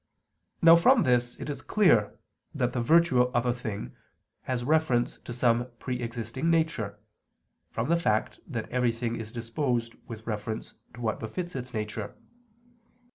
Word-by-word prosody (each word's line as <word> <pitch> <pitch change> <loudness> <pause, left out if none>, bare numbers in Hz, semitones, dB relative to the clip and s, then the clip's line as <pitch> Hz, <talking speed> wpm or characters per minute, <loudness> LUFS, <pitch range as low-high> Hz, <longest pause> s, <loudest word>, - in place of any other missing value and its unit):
Now 165 0 +10
from 230 +8 +5
this 120 -1 +2
it - - -6
is 140 -3 -4
clear 155 - +3 0.4
that 125 -1 0
the 125 - 0
virtue 160 0 +5
of 125 -1 +1
a 120 - +2
thing 110 - -6 0.5
has 125 -2 0
reference 145 -4 +2
to - - -9
some 120 0 +2
pre 125 0 -4
existing 115 +6 -3
nature, 160 -12 0 0.7
from - - -2
the 170 +2 +3
fact 110 -9 0
that 115 -6 -4
everything 120 -1 0
is 110 -1 -7
disposed 115 0 -2
with 110 -2 -8
reference 110 0 -4 0.2
to 120 - -10
what 110 -2 -1
befits 170 +11 -5
its 130 -1 -5
nature. 105 -2 -4
120 Hz, 150 wpm, -28 LUFS, 115-140 Hz, 0.7 s, Now